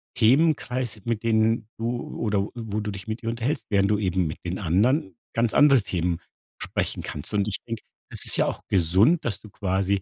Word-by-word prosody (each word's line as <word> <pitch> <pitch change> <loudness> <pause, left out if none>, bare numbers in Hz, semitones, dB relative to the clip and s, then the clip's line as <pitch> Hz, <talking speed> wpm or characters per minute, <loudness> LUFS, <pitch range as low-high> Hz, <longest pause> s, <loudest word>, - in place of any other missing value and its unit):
Themenkreis, 125 -2 +2
mit 115 -2 -1
denen 110 -1 +2
du 120 +2 -3
oder 100 -2 0
wo 110 -3 -3
du 105 0 -3
dich 100 +2 -8
mit 110 +2 -4
ihr 115 - -2
unterhältst, 120 +6 -2
während 100 -1 +3
du 105 - +2
eben 95 -3 +1
mit 75 - -4
den 90 +1 -3
anderen 95 - +1 0.2
ganz 115 -1 +1
andere 140 -5 +6
Themen 85 -3 -1 0.4
besprechen - - -2
kannst. 75 - -5
Und 100 0 +2
ich 105 - 0
denke, 115 -1 -5 0.3
es - - -5
ist - - +2
ja - - +3
auch - - -3
gesund, 95 - +3
dass 115 - -2
du 110 - -13
quasi, 95 0 0
110 Hz, 200 wpm, -25 LUFS, 95-115 Hz, 0.4 s, andere